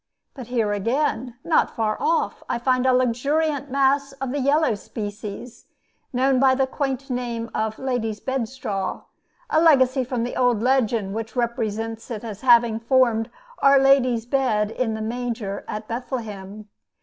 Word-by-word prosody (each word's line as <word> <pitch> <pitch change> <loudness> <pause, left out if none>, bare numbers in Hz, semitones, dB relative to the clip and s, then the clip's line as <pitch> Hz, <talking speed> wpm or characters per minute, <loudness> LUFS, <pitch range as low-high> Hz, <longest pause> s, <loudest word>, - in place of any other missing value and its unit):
But 255 -5 -9
here 230 -4 0
again, 240 +3 -1
not 330 - +2
far 215 -2 0
off, 330 +1 0
I - - 0
find 255 +1 +1
a - - +5
luxuriant 280 +4 +1
mass 275 +1 +2
of 270 -2 -5
the 285 - -2
yellow 285 0 +2
species, 210 +3 -7 0.5
known 260 +1 +2
by 265 0 +5
the 265 0 +2
quaint 270 0 -3
name 235 -2 -3
of 220 0 -2
"lady's 240 -5 -2
bedstraw," 235 -6 -3 0.5
a 315 - +4
legacy 265 -5 +4
from 250 -1 -2
the 245 - -4
old 245 -4 +2
legend 230 -6 +1
which 225 0 -5
represents 225 -2 -2
it 225 -3 -5
as 215 -3 -7
having 235 -3 +5
formed 230 -2 +2 0.3
Our 275 0 +6
Lady's 260 -4 +3
bed 235 -5 +1
in 225 -2 -1
the 220 - -4
manger 225 -3 -4
at 215 0 -5
Bethlehem. 215 -4 -6
245 Hz, 150 wpm, -23 LUFS, 220-265 Hz, 0.5 s, Our